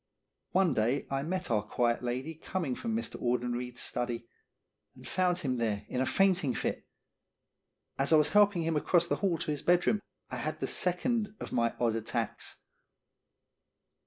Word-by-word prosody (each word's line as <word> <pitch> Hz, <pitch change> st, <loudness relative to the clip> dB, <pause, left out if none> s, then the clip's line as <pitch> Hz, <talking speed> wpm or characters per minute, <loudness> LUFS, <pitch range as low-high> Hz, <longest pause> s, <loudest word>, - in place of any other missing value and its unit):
One 190 Hz, -2 st, +3 dB
day 120 Hz, +6 st, +1 dB
I 135 Hz, 0 st, 0 dB
met 180 Hz, 0 st, -3 dB
our 105 Hz, -2 st, +3 dB
quiet 120 Hz, +3 st, 0 dB
lady 130 Hz, +6 st, -3 dB
coming 160 Hz, -2 st, -3 dB
from 225 Hz, -, -3 dB
Mr. 230 Hz, -, -4 dB
Audenried's 125 Hz, 0 st, -1 dB
study, 120 Hz, -1 st, -1 dB, 0.7 s
and -, -, -12 dB
found 180 Hz, -1 st, +1 dB
him 130 Hz, -8 st, -1 dB
there 110 Hz, -4 st, -1 dB
in 125 Hz, -, -1 dB
a 130 Hz, -, +1 dB
fainting 185 Hz, -9 st, +2 dB
fit. -, -, -2 dB, 1.1 s
As 135 Hz, +3 st, +2 dB
I -, -, +8 dB
was 150 Hz, -1 st, +5 dB
helping 205 Hz, -4 st, +4 dB
him 165 Hz, 0 st, 0 dB
across 170 Hz, +3 st, +3 dB
the 170 Hz, -, 0 dB
hall 185 Hz, -4 st, +1 dB
to 155 Hz, -, -3 dB
his 145 Hz, -, -2 dB
bedroom 175 Hz, +4 st, +3 dB, 0.3 s
I -, -, -3 dB
had -, -, -3 dB
the -, -, -1 dB
second 210 Hz, +4 st, 0 dB
of -, -, -6 dB
my 115 Hz, 0 st, +1 dB
odd 115 Hz, -2 st, +2 dB
attacks. 115 Hz, 0 st, -3 dB
145 Hz, 165 wpm, -31 LUFS, 120-180 Hz, 1.1 s, I